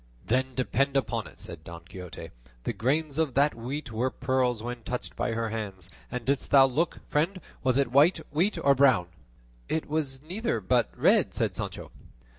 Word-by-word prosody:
"Then 130 Hz, +5 st, 0 dB
depend 135 Hz, +2 st, +1 dB
upon 115 Hz, -5 st, -1 dB
it," -, -, -15 dB
said 85 Hz, -3 st, -10 dB
Don 85 Hz, 0 st, -9 dB
Quixote, 90 Hz, -1 st, -9 dB, 0.3 s
"the -, -, -2 dB
grains 145 Hz, +4 st, 0 dB
of 155 Hz, -6 st, 0 dB
that 145 Hz, +2 st, +4 dB
wheat 125 Hz, +4 st, -5 dB
were 120 Hz, +4 st, 0 dB
pearls 125 Hz, -3 st, 0 dB
when 120 Hz, 0 st, -5 dB
touched 125 Hz, +2 st, -5 dB
by 115 Hz, -, -1 dB
her 115 Hz, 0 st, -1 dB
hands; 100 Hz, -5 st, -5 dB, 0.2 s
and 125 Hz, -2 st, -4 dB
didst 140 Hz, 0 st, 0 dB
thou 135 Hz, -1 st, +8 dB
look, 150 Hz, +6 st, -1 dB
friend? 170 Hz, +6 st, 0 dB, 0.2 s
was 130 Hz, -1 st, +2 dB
it 140 Hz, -4 st, +1 dB
white 145 Hz, +7 st, +6 dB, 0.2 s
wheat 180 Hz, +8 st, +2 dB
or 140 Hz, -, +6 dB
brown?" 130 Hz, -10 st, +4 dB, 0.6 s
"It 160 Hz, -, -1 dB
was 145 Hz, -3 st, -1 dB
neither, 180 Hz, -, -2 dB
but 120 Hz, +3 st, +2 dB
red," -, -, +4 dB
said -, -, 0 dB
Sancho. -, -, -5 dB
130 Hz, 180 wpm, -28 LUFS, 115-140 Hz, 0.6 s, thou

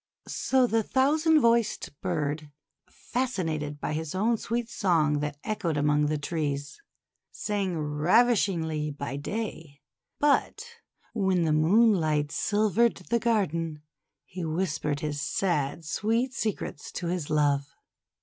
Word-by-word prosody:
So 260 Hz, -1 st, +2 dB
the 225 Hz, -2 st, +2 dB
thousand 305 Hz, +7 st, +3 dB
voiced 230 Hz, -, +1 dB
bird, 150 Hz, 0 st, -2 dB, 0.4 s
fascinated 165 Hz, -, -3 dB
by -, -, -3 dB
his 160 Hz, +2 st, -4 dB
own 220 Hz, +5 st, +2 dB
sweet 235 Hz, +2 st, -2 dB
song 165 Hz, -10 st, +1 dB
that 145 Hz, 0 st, -3 dB
echoed 205 Hz, -8 st, -2 dB
among 150 Hz, 0 st, +2 dB
the 155 Hz, 0 st, 0 dB
trees, 145 Hz, -, -3 dB, 0.5 s
sang 200 Hz, -4 st, -2 dB
ravishingly 160 Hz, 0 st, +2 dB
by 140 Hz, -1 st, -5 dB
day; 160 Hz, -4 st, -5 dB, 0.4 s
but 295 Hz, +9 st, +1 dB, 0.5 s
when 190 Hz, -5 st, +1 dB
the 155 Hz, -2 st, +2 dB
moon 205 Hz, +9 st, +5 dB
light 155 Hz, -5 st, 0 dB
silvered 215 Hz, +4 st, +2 dB, 0.2 s
the 235 Hz, -, +3 dB
garden, 165 Hz, -9 st, -1 dB, 0.4 s
he 180 Hz, -1 st, -7 dB
whispered 155 Hz, -3 st, -1 dB
his 150 Hz, -2 st, -3 dB
sad, 160 Hz, -2 st, -1 dB
sweet 230 Hz, -, 0 dB
secrets 215 Hz, -10 st, -4 dB
to 175 Hz, -, -4 dB
his 170 Hz, -3 st, -2 dB
love. 145 Hz, -2 st, +2 dB
170 Hz, 120 wpm, -27 LUFS, 150-225 Hz, 0.5 s, moon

